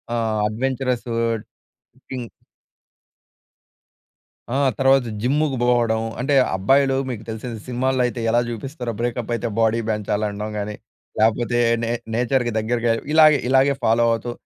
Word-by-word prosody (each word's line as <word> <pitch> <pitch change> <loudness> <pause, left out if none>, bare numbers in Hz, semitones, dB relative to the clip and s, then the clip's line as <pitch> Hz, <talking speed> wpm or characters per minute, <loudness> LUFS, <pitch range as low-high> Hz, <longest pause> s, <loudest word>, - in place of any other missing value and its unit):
ఆహ్, 110 -2 0
అడ్వెంచరసు 125 +1 -2 1.0
టింగ్ 125 -3 -5 2.2
ఆ! - - -1 0.2
తర్వాత, 135 -1 +4 0.2
జిమ్ముకు 140 +1 +1
బోవడం 120 -2 +2 0.2
అంటే, 140 +3 +1 0.2
అబ్బాయిలు 135 +8 +3
మీకు 115 -3 -5
తెలిసిన 110 +2 -5 0.2
సినిమాల్లో 130 +1 0
అయితే 120 0 -3
ఎలా 120 +1 +3
జూపిస్తరో, 125 +2 -5
బ్రేకప్ 120 0 -2
అయితే 115 - -3
బోడీ 115 0 +2
పెంచాలనడం 105 0 -2
గాని, 105 0 -4 0.4
లేపోతే, 115 +2 +2 0.2
నే 115 - -1 0.2
నేచర్‍కి 125 +1 +1
దగ్గరగా 115 +1 0 0.2
ఇలాగె, 155 -2 +7
ఇలాగే 135 +1 +4
ఫాలో 115 +1 +3
అవుతూ, 120 +1 -3
120 Hz, 115 wpm, -21 LUFS, 110-130 Hz, 2.2 s, ఇలాగె